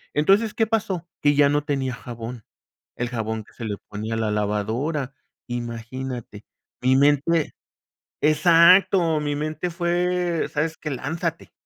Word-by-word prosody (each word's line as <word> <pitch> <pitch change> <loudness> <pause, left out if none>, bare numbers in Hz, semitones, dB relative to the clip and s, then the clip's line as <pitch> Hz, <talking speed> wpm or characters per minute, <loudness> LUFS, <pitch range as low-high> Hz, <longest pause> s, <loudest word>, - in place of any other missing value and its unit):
Entonces, 200 +8 +3
¿qué 225 - +2
pasó? 195 -6 -1
Que 145 0 +4
ya 145 -1 +5
no 145 0 +1
tenía 135 -3 -1
jabón, 120 -2 -8 0.5
el 125 - -2
jabón 110 -2 -3
que - - -22
se 115 - -7
le 105 -2 -3
ponía 110 +2 -4
a - - -2
la 110 -1 0
lavadora. 110 +8 -1 0.3
Imagínate, 120 -1 -6 0.4
mi 130 +1 +4
mente 145 +3 +2 0.7
exacto. 170 +2 +5
Mi 145 -1 -1
mente 155 +3 -3
fue: 175 0 0
"¿Sabes 160 +2 -1
qué? 155 - -5
Lánzate". 145 +5 -3
145 Hz, 140 wpm, -23 LUFS, 120-170 Hz, 0.7 s, ya